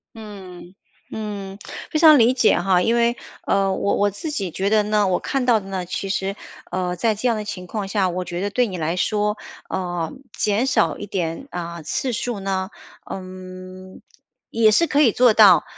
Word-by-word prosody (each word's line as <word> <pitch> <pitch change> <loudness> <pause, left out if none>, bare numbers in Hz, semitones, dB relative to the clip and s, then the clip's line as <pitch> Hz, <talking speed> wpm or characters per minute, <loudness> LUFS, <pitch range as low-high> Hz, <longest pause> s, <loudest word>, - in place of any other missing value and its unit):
嗯， 190 -5 -10 0.4
嗯， 200 -3 -6 0.3
非 310 - +1
常 315 -3 +8
理 240 0 +5
解 245 -7 +3
哈， 180 0 +2
因 230 +5 +2
为， 235 0 +2 0.3
呃， 195 -1 +2
我 200 - 0
我 205 - +2
自 250 - -6
己 195 -10 -2
觉 190 +4 -1
得 215 0 +4
呢， 210 -1 +2
我 180 -1 +1
看 270 -2 -2
到 235 -3 +4
的 195 - -12
呢， 190 -2 -4
其 195 +2 -4
实， 195 0 -1 0.4
呃， 180 0 -1
在 220 +5 +1
这 215 +4 -2
样 230 -2 +1
的 210 - -5
情 180 -3 -6
况 205 0 -4
下， 195 -2 +1
我 180 +1 -3
觉 175 0 -4
得 205 - -1
对 245 +4 +1
你 190 -5 -5
来 165 +1 -1
说， 210 +2 0 0.3
呃， 175 -3 -3 0.2
减 210 +4 +1
少 265 - +1
一 205 - -6
点， 180 +4 -3
啊， 170 -1 -5
次 255 - -2
数 235 -1 -3
呢， 190 -1 -2 0.4
嗯， 185 0 -9 0.5
也 225 -1 +4
是 325 +10 +3
可 295 0 +2
以 250 -7 +5
做 245 +1 +4
到。 195 -7 +7
200 Hz, 210 characters per minute, -22 LUFS, 185-220 Hz, 0.5 s, 常